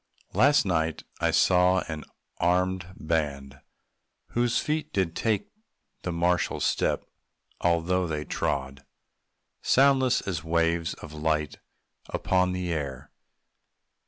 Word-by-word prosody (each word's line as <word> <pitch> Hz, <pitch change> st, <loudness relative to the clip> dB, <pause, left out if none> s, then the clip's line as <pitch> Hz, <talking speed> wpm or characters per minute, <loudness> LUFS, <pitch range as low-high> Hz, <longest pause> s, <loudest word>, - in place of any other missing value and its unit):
Last 140 Hz, +8 st, +5 dB
night 80 Hz, -4 st, 0 dB, 0.2 s
I 85 Hz, -, +2 dB
saw 90 Hz, +3 st, +4 dB
an 80 Hz, -2 st, -5 dB, 0.4 s
armèd 90 Hz, +1 st, +1 dB
band, 70 Hz, -4 st, -2 dB, 0.7 s
whose 120 Hz, 0 st, +1 dB
feet 155 Hz, 0 st, -1 dB
Did 90 Hz, -4 st, 0 dB
take 105 Hz, -3 st, 0 dB, 0.5 s
the 90 Hz, -, -3 dB
martial 85 Hz, +1 st, +1 dB
step, -, -, 0 dB, 0.5 s
although 85 Hz, +1 st, +1 dB
they 75 Hz, -2 st, -3 dB
trod 65 Hz, 0 st, -2 dB, 0.8 s
Soundless 130 Hz, -1 st, +4 dB
as 85 Hz, -6 st, -3 dB
waves 85 Hz, 0 st, +1 dB
of 75 Hz, -, -11 dB
light 75 Hz, -1 st, -1 dB, 0.5 s
upon 90 Hz, 0 st, +1 dB
the 90 Hz, -1 st, -2 dB
air. 70 Hz, -3 st, -5 dB
85 Hz, 105 wpm, -27 LUFS, 80-95 Hz, 0.8 s, Last